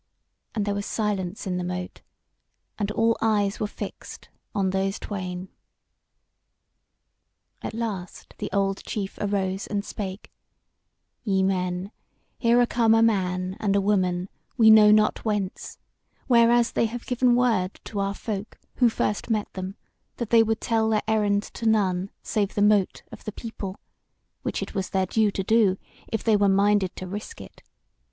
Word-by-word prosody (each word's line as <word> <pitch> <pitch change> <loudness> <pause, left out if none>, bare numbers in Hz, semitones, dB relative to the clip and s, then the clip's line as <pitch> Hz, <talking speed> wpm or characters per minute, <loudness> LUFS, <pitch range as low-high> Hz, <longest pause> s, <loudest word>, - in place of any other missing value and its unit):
And 210 -2 0
there 205 - 0
was 200 0 -3
silence 205 -3 -2
in 180 -2 -1
the 180 - -2
Mote, 180 0 -5 0.8
and 205 -1 0
all 225 +1 +2
eyes 205 -3 +1
were 215 - 0
fixed - - -8 0.3
on 195 -2 +1
those 195 +1 0
twain. 185 -2 -5 2.1
At - - -5
last 205 -6 -5
the - - -3
old 195 -1 0
chief 195 -2 -4
arose 195 -2 -1
and 205 0 -2
spake: 195 -1 -6 0.9
"Ye 195 -4 +1
men, 185 0 -1 0.5
here 235 0 +4
are 245 - +5
come 230 -2 +3
a 225 - +5
man 185 -4 +1
and 200 -2 +1
a - - +4
woman, 185 -3 +1 0.3
we 220 -2 +7
know 215 -1 +8
not 215 0 +4
whence; 210 -4 -3 0.5
whereas 235 -1 +4
they 230 - +1
have 235 +2 -7
given 250 -1 +3
word 225 -7 +1
to 205 - -5
our 195 0 -1
folk 210 0 -5 0.2
who 245 -2 +5
first 210 0 -2
met 215 -2 -1
them, 190 +1 -5 0.4
that 235 -3 -4
they 230 -1 +7
would 225 0 +1
tell 225 -1 +1
their 215 -1 +1
errand 205 -2 +2
to 230 - -5
none 195 -4 +2
save 205 -2 -1
the 205 - +2
Mote 205 -2 +2
of - - -11
the 215 - -4
People; 205 -3 -7 0.6
which - - -2
it - - -8
was 190 -2 -2
their 190 -1 +1
due 215 +3 +2
to 195 -1 -3
do, 210 -2 +3 0.3
if 225 - -3
they 220 -2 +4
were 200 -1 +3
minded 200 -1 +3
to 185 - -6
risk 210 - -7
it. - - -12
205 Hz, 165 wpm, -25 LUFS, 190-220 Hz, 2.1 s, know